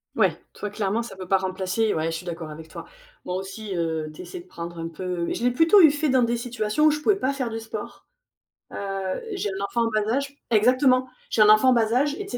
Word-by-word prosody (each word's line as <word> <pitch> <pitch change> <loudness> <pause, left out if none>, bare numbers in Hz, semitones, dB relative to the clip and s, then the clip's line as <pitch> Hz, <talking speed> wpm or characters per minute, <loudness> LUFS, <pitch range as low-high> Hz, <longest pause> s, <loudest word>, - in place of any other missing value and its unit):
Ouais. - - +2 0.2
Toi, 210 - -5
clairement, 205 +1 -1
ça 230 -4 -8
peut 185 -1 -8
pas 195 - +4
remplacer 190 +3 -1
ouais, 155 - -1
je 165 - -3
suis 180 - -10
d'accord 165 -3 -6
avec 160 +1 -10
toi, - - -9 0.4
moi 180 - -3
aussi, 195 +2 -5
heu, 160 -2 -2
tu 155 - -10
essaies 175 -1 -8
de - - -18
prendre 170 -1 -8
un 165 0 -4
peu 175 +1 -3
je - - -4
l'ai 245 - +4
plutôt 325 +10 +5
eu 320 - +9
fait 295 +1 0
dans 260 -1 +4
des 235 0 +1
situations 235 +3 0
où 310 - +6
je 300 - -2
pouvais 400 +7 +3
pas 280 -8 -1
faire 260 -4 -2
du 225 0 -4
sport, 225 0 -8 0.7
heu, - - -7 0.6
j'ai 385 - -2
un 195 +1 -5
enfant 235 - 0
en 230 - 0
bas 215 +1 0
âge 280 +1 -2 0.2
exactement, 255 +3 +4 0.2
j'ai 215 - +3
un 210 - +7
enfant 215 +5 +6
en - - +4
bas 225 -2 +2
âge 285 +4 +2
et 410 - -4
tu 395 - -11
215 Hz, 255 wpm, -24 LUFS, 185-255 Hz, 0.7 s, eu